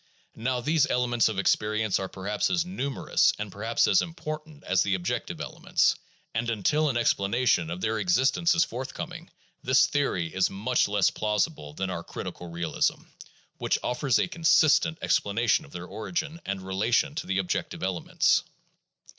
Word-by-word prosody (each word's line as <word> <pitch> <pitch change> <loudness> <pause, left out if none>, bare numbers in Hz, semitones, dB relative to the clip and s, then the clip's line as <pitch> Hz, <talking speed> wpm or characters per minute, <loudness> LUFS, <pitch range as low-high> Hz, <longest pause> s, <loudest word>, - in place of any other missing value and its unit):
Now 125 +2 -1
these 155 +3 +2
elements 120 -2 +2
of 110 - -4
experience 105 +1 +1
are 95 -1 -4
perhaps 100 +2 -2
as 175 -2 +1
numerous 140 -8 +1
and 105 -1 -5
perhaps 110 +4 +1
as 185 - +4
im 165 -1 -6
portant 155 -2 -7
as 95 0 +2
the 100 -1 +1
objective 90 -1 -3
elements; - - +1 0.4
and 115 +1 -1
until 150 +8 +1
an 125 - 0
explanation 110 -5 +2
of 90 +2 -5
their 110 +1 0
existence 130 - +2
is 165 - +4
forthcoming, 165 +8 -7 0.3
this 130 +1 +4
theory 95 - -1
is 95 0 +2
much 110 +6 +1
less 100 -2 +2
plausible 105 - -2
than 95 +2 -2
our 85 -2 -4
critical 90 +1 -7
realism, 85 0 -1 0.6
which - - +1
offers 125 +1 +1
a - - +1
consistent 160 -2 +3
explanation 105 +1 +1
of 70 - -17
their 90 0 -7
origin 155 - -4
and 100 -1 -3
relation 110 +11 +1
to 155 - -5
the 95 - 0
objective 95 -1 -2
elements. 95 -2 +2
115 Hz, 160 wpm, -27 LUFS, 95-150 Hz, 0.6 s, as